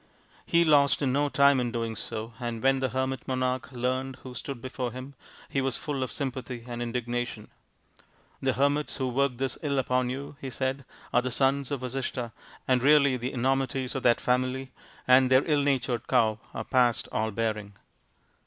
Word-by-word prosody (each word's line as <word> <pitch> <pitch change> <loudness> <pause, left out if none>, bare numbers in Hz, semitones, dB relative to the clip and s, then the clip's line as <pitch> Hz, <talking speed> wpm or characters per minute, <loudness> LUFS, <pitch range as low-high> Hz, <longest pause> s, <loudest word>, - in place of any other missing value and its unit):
He 170 0 +4
lost 145 -3 +4
no 140 +2 +2
time 140 -1 +5
in 120 -1 -1
doing 115 -2 -2
so, 110 +2 -5
and 120 -2 -4
when 135 0 +4
the 130 -1 0
hermit 130 +1 -2
monarch 130 +1 -1
learnt 130 +1 -2
who 130 - -8
stood 130 +1 -5
before 125 0 -4
him, 130 +3 -8 0.3
he 135 - -1
was 135 -2 -1
full 145 -3 -3
of 130 -3 -2
sympathy 130 -3 -4
and 120 -1 -5
indignation. 120 -2 -3 0.5
" - - -33
The 135 -1 +2
hermits 145 +3 +1
who 130 -2 -1
worked 135 0 +1
this 135 +1 -2
ill 140 -3 -1
upon 125 -1 +1
you," 140 +2 -6
he 135 - -4
said, 130 +2 -2
" - - -23
are 120 - +5
the 130 - -2
sons 135 +2 +1
of 140 -3 -3
Vasishtha, 125 -2 -3 0.4
and 130 -1 +3
really 140 -1 +5
the 125 +1 -3
enormities 130 0 0
of 135 - -2
that 120 -1 +4
family 130 +1 0 0.4
and 130 0 +6
their 130 +1 +5
ill 150 -2 +2
natured 130 -4 0
cow 110 -4 +3
are 110 - -4
past 120 -1 +2
all 110 +1 0
bearing. 110 -2 -2
130 Hz, 185 wpm, -28 LUFS, 120-135 Hz, 0.5 s, and